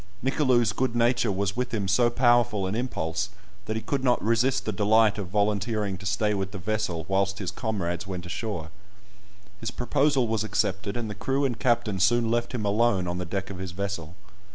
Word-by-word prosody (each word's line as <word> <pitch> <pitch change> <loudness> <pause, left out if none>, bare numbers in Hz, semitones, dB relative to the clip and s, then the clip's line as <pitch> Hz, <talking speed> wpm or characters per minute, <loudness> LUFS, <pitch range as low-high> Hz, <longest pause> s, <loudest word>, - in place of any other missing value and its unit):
Nicolou's 130 -5 +2
good 125 -1 -1
nature 120 -2 +2
was 100 +1 -1
with 125 +1 -2
him 105 -4 -1
so 120 +5 +4
powerful 120 -4 +3
an 95 - -2
impulse, 100 -6 -2 0.4
that 110 - -3
he 110 - -3
could 140 -2 -2
not 125 -2 +3
resist 115 +4 +2
the - - 0
delight 110 0 +3
of 100 - -4
volunteering 105 +1 0
to 95 - -5
stay 105 +1 +1
with 95 -2 -2
the 105 - -6
vessel 95 -4 -2
whilst 100 0 +1
his 95 -3 -3
comrades 95 -5 -3
went 90 -2 -5
ashore. 90 -4 -4 0.9
His 115 - -3
proposal 130 +1 +1
was 110 -1 0
accepted, 100 0 -1
and 120 -2 -3
the 105 - -4
crew 135 +7 0
and 120 -4 -2
captain 115 -6 +1
soon 115 +3 +3
left 120 0 0
him 110 -3 -2
alone 100 -3 +2
on 90 +1 -2
the 90 - -3
deck 95 +3 -4
of 95 - -7
his 95 -2 -5
vessel. 90 -4 -4
105 Hz, 200 wpm, -26 LUFS, 95-120 Hz, 0.9 s, so